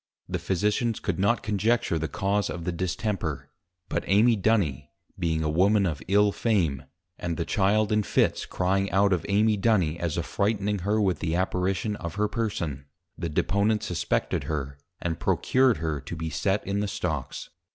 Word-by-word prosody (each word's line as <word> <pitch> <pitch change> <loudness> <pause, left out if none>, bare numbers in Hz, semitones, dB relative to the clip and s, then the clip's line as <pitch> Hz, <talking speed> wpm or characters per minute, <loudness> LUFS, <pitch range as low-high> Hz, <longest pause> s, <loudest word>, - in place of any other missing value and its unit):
The 90 -1 -2
Physicians 105 +6 0
could - - -2
not 100 +5 +2
conjecture 105 -3 +1
the 80 - -2
cause 100 0 0
of 85 - -5
the 90 - -1
Distemper; 85 -3 -3 0.4
but - - -2
Amy 110 +4 +5
Duny 100 - +1 0.3
being 80 -2 0
a - - 0
Woman 95 +6 +3
of 75 -7 -2
ill 105 +1 +4
Fame, 85 - 0 0.3
and 85 -2 -3
the 85 - -1
Child 105 +1 +2
in 105 0 +3
Fits - - +1
crying 95 +2 0
out 100 +1 +3
of 85 - -2
Amy 105 +1 +3
Duny, 90 -7 +2
as 85 -2 -2
affrighting 100 0 0
her 105 +4 0
with 95 -6 +1
the 80 -1 -1
Apparition 95 +3 0
of 85 -1 -6
her 105 +1 +1
Person, 85 - -3 0.3
the 85 - -4
Deponent 100 +7 +1
suspected 85 -2 -1
her, 70 -3 -4 0.2
and 85 -1 -3
procured 130 - +2
her 80 -3 -2
to 75 +5 -7
be 80 0 -4
set 100 +6 0
in 100 +1 -1
the 105 - -1
stocks. - - -4
95 Hz, 170 wpm, -26 LUFS, 85-105 Hz, 0.4 s, Amy